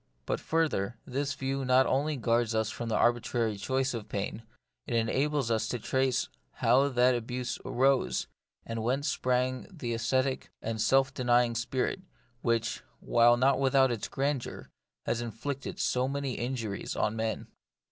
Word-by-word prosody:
But - - -1
further, 135 -10 0
this 140 +1 -2
view 135 0 -2
not 130 +1 +4
only 145 +3 +1
guards 115 -1 +1
us 110 0 +1
from 120 -1 -5
the 110 - 0
arbitrary 120 -2 +1
choice 130 +6 -1
of 115 -3 -6
pain, 100 +2 -3 0.5
it 120 - -1
enables 130 +3 +1
us 110 -1 +1
to 125 - -2
trace 130 +2 0 0.3
how 135 +3 +3
that 125 -1 +4
abuse 125 +1 -3
arose, 130 +1 +2 0.4
and 115 0 -4
whence 130 +6 0
sprang 130 -2 0
that 170 -7 -14
ascetic 130 +4 0
and 110 -1 -3
self 135 +4 +3
denying 120 -2 +3
spirit, 125 - -1 0.4
which, 115 -1 0 0.2
while 120 +1 +4
not 135 +3 +3
without 135 -1 +4
its 115 -3 -3
grandeur, 140 -2 -3 0.3
has 120 - 0
inflicted 130 +4 -5
so 125 +1 +1
many 140 -1 -2
injuries 120 -5 -3
on 105 +1 0
men. 110 -1 -2
125 Hz, 150 wpm, -30 LUFS, 115-135 Hz, 0.5 s, not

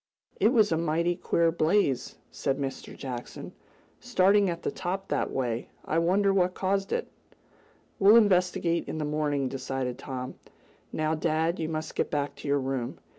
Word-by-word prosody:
"It 205 - +5
was 220 -5 +4
a 160 - +2
mighty 170 +2 +1
queer 170 -1 +1
blaze," 155 -6 +1 0.2
said 135 -1 -1
Mr. 135 -2 -5
Jackson, 125 -3 -7 0.5
"starting 195 +1 +3
at 170 0 -4
the - - -1
top 190 +2 -4
that - - 0
way. 120 -3 -2 0.2
I 160 - +1
wonder 195 +4 +3
what 180 -1 +2
caused 195 +1 -1
it?" 475 - -1 0.9
"We'll 205 +3 +7
investigate 180 -5 +3
in - - -4
the 155 - -2
morning," 150 -2 0
decided 130 -1 -3
Tom. 130 -1 -6 0.5
"Now, 155 0 0
dad, 160 +2 0
you 160 -1 -2
must 155 -1 -4
get - - -1
back 145 -1 -1
to - - -8
your 140 0 +2
room." 130 -2 -3
160 Hz, 165 wpm, -28 LUFS, 140-185 Hz, 0.9 s, We'll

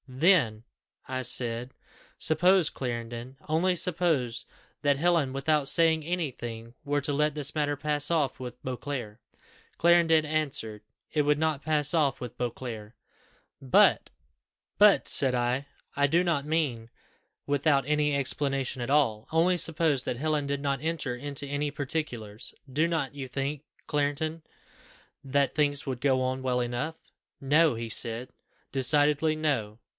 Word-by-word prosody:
'Then,' 130 - +2 0.4
I 130 0 -3
said, 120 0 -1 0.4
'suppose, 175 +2 +3
Clarendon 120 +1 -6
only 170 +4 +1
suppose 160 -9 0 0.4
that 145 -2 +2
Helen, 165 -3 +2
without 135 +1 0
saying 160 -2 +4
any 170 -2 -2
thing, 115 -1 -8
were 145 0 0
to 145 +1 -1
let 150 +1 +1
this 150 0 -2
matter 145 -1 0
pass 145 0 0
off 150 -7 0
with 125 -1 -8
Beauclerc?' 125 -4 -5 0.6
Clarendon 165 -2 +4
answered, 140 -9 -2 0.3
'It 155 - +3
would 145 0 +2
not 155 -2 -1
pass 150 -1 +1
off 150 -6 +1
with 125 -2 -8
Beauclerc.' 120 -3 -5 0.7
'But,' 130 -2 +4 1.0
said 135 -2 +3
I, 125 +3 -1 0.3
'I 140 0 +3
do 170 +5 +2
not 155 -5 0
mean 145 -8 -1 0.6
without 140 -1 +2
any 150 -1 +1
explanation 135 -1 -1
at 120 - -3
all. 125 -7 +2
Only 170 +3 +3
suppose 160 -5 +1
that 120 - -3
Helen 150 +1 0
did 140 0 -2
not 140 -2 -1
enter 155 -6 -2
into 140 +2 -4
any 145 +1 -2
particulars, 130 -7 -4 0.2
do 155 +5 +2
not 160 -6 -2
you 140 -2 -6
think, 135 +3 -3 0.2
Clarendon, 150 +2 -1 0.8
that 140 0 +1
things 145 -2 +1
would 130 -3 -4
go 130 -2 +2
on 130 +1 -1
well 125 -1 0
enough?' 125 +7 -3 0.4
'No,' 150 +1 +3
he 115 0 -5
said 115 +2 +1 0.4
decidedly, 145 +3 +3
'no. 120 -9 -1
140 Hz, 140 wpm, -28 LUFS, 125-155 Hz, 1.0 s, saying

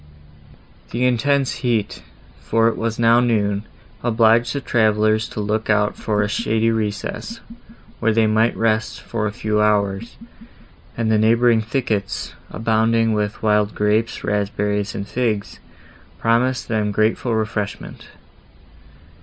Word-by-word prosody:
The 125 +2 -1
intense 130 +2 +1
heat, 115 -5 -1 0.4
for 115 0 +1
it 115 - 0
was 115 -1 -3
now 115 0 +4
noon, 105 -4 0 0.4
obliged 115 0 +3
the - - 0
travellers 110 -3 +1
to - - -7
look 105 +2 -2
out 105 -1 +2
for 105 -1 -1
a - - 0
shady 110 +2 0
recess, 115 - -3 0.6
where 115 - +2
they 110 0 +3
might 110 +2 +2
rest, 110 +1 0
for 110 -2 -3
a - - -3
few 105 0 -1
hours, 105 0 0 0.8
and 115 -1 0
the 110 - +3
neighbouring 115 +1 +4
thickets, 110 -3 -2 0.2
abounding 115 0 +1
with 105 0 -2
wild 105 -1 +2
grapes, 105 +2 0
raspberries, 105 0 -1
and 100 0 -5
figs, 110 -4 -2 0.6
promised 125 +3 +1
them 110 -2 0
grateful 110 +3 0
refreshment. 110 -2 -4
110 Hz, 130 wpm, -20 LUFS, 105-115 Hz, 0.8 s, now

